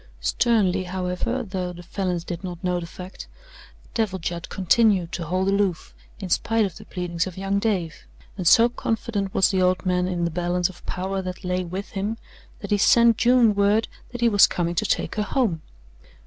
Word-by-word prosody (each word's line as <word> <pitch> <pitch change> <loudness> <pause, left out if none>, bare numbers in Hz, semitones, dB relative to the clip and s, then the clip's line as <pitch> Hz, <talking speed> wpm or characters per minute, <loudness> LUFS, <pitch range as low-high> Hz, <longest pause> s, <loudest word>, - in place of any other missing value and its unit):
Sternly, 195 -6 +1
however, 185 +7 -2
though 185 -4 -4
the 175 0 -11
Falins 180 -1 -2
did 175 +1 -6
not 180 -1 -7
know 180 -1 0
the 170 - -7
fact, 180 +2 -10 0.7
Devil 215 -5 0
Judd 170 -1 -5
continued 190 -2 +2
to 170 - -4
hold 185 +4 0
aloof 195 -4 0 0.3
in 195 - -5
spite 225 +4 +1
of 190 - -5
the 210 - -12
pleadings 175 -2 -3
of 185 - -8
young 195 +1 0
Dave, 190 -7 -2 0.3
and 185 -4 -2
so 230 +6 +7
confident 225 -4 -2
was 190 - +3
the 190 -1 +1
old 185 +1 +1
man 180 0 +1
in 175 -2 -1
the 170 - -1
balance 175 +1 0
of 180 - -14
power 190 +1 -2
that 185 +1 -6
lay 180 0 -1
with 185 +3 -6
him 205 +3 -3 0.4
that 200 - -7
he 205 - +3
sent 235 +1 +5
June 245 -3 +4
word 205 +2 +2 0.2
that 245 -1 -7
he 235 - +4
was 205 -3 +6
coming 170 -1 -2
to 170 - 0
take - - 0
her - - +1
home. 210 - 0
190 Hz, 195 wpm, -24 LUFS, 180-210 Hz, 0.7 s, so